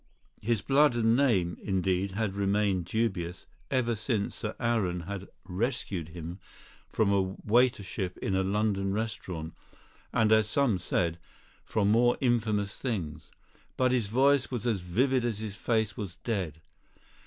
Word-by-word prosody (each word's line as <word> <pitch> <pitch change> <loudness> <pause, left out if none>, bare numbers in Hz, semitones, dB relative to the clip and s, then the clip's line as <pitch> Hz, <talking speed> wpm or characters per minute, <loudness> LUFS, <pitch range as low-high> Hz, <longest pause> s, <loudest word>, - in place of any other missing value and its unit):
His 115 -1 0
blood 140 -1 +4
and 115 -1 +3
name, 100 -11 +2
indeed, 95 0 0
had 105 -1 -1
remained 100 -2 +1
dubious, 95 -3 -2 0.2
ever 120 -3 +1
since 105 -1 -1
Sir 105 0 -4
Aaron 105 -8 0
had 100 +2 -6 0.2
"rescued" 95 - -2
him 85 +2 -7 0.5
from 100 -2 +2
a 95 -1 +1
waitership 105 -5 +1
in 95 - -1
a 95 - +3
London 100 0 0
restaurant, 90 -7 -4 0.6
and 110 -1 +3
(as 110 -1 +4
some 120 -7 +2
said) 85 -1 0 0.4
from 105 -1 +1
more 120 +2 +4
infamous 110 -5 +1
things. 80 - -4 0.5
But 130 -1 +3
his 120 -5 +1
voice 135 +5 +3
was 120 -3 -4
as 110 -6 +1
vivid 125 +9 +1
as 120 -4 -1
his 105 -2 -5
face 110 0 0
was 100 -7 -5
dead. 90 -7 -3
105 Hz, 145 wpm, -29 LUFS, 95-115 Hz, 0.6 s, blood